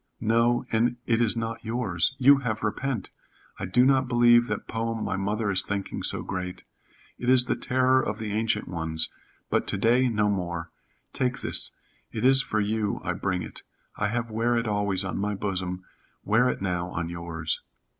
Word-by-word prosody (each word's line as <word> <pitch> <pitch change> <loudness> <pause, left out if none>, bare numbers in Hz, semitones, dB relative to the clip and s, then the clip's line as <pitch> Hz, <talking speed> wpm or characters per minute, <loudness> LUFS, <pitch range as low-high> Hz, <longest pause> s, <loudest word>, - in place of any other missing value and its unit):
"No, 115 +2 +2
and 120 +2 +2
it 115 0 +2
is 115 0 +2
not 115 0 -3
yours. 110 -2 0
You 140 +2 +7
have 115 -6 -3
repent. 115 +2 -2 0.5
I 95 - -3
do 125 +8 +4
not 135 -1 +3
believe 120 -1 +5
that 105 -1 -4
poem 115 0 -2
my - - -1
mother 100 +2 -1
is 95 -1 +5
thinking 100 0 -4
so - - -2
great. 90 -1 -5 0.6
It 120 - -1
is 130 -1 +6
the - - 0
terror 130 +1 +2
of 105 - -3
the 110 -2 -4
ancient 110 -1 0
ones, 80 -2 -2 0.4
but - - +1
to - - -1
day, 125 +3 +3
no 105 -2 +1
more. 85 -4 -2 0.4
Take 125 -1 -1
this. - - +1 0.4
It - - -2
is 135 +1 +7
for 110 -5 -1
you 105 0 0
I - - -1
bring 95 -2 -2
it. - - -9 0.3
I 105 - 0
have 115 +1 -2
wear 115 +2 +1
it 115 0 -1
always 100 -2 0
on 95 - -3
my 105 +1 -1
bosom, 95 -2 -3 0.4
wear 115 +5 +3
it - - -3
now 90 -2 -1
on 85 -2 -3
yours." 85 -2 -4
110 Hz, 185 wpm, -26 LUFS, 95-120 Hz, 0.6 s, You